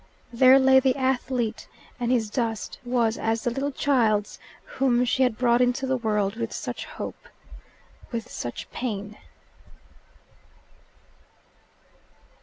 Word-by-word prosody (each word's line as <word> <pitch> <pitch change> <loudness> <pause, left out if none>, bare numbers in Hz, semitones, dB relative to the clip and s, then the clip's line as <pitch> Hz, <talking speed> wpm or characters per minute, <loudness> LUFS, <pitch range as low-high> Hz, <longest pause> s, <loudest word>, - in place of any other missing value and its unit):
There 255 +2 +7
lay 265 0 +6
the 260 -1 +2
athlete, 255 -3 -1 0.3
and 240 0 0
his 225 -4 +1
dust 225 -3 -3
was 240 -2 0
as 225 0 -1
the 240 - 0
little 275 +4 -2
child's 230 -7 +1 0.3
whom 250 -2 +1
she 255 +2 0
had 250 -4 +2
brought 240 -1 +3
into 250 +2 +1
the 260 0 0
world 210 -3 -1
with 230 -1 -3
such - - -5
hope, - - -8 0.8
with 235 -1 -4
such 120 - -6
pain. 210 -4 -5
240 Hz, 120 wpm, -25 LUFS, 225-260 Hz, 0.8 s, There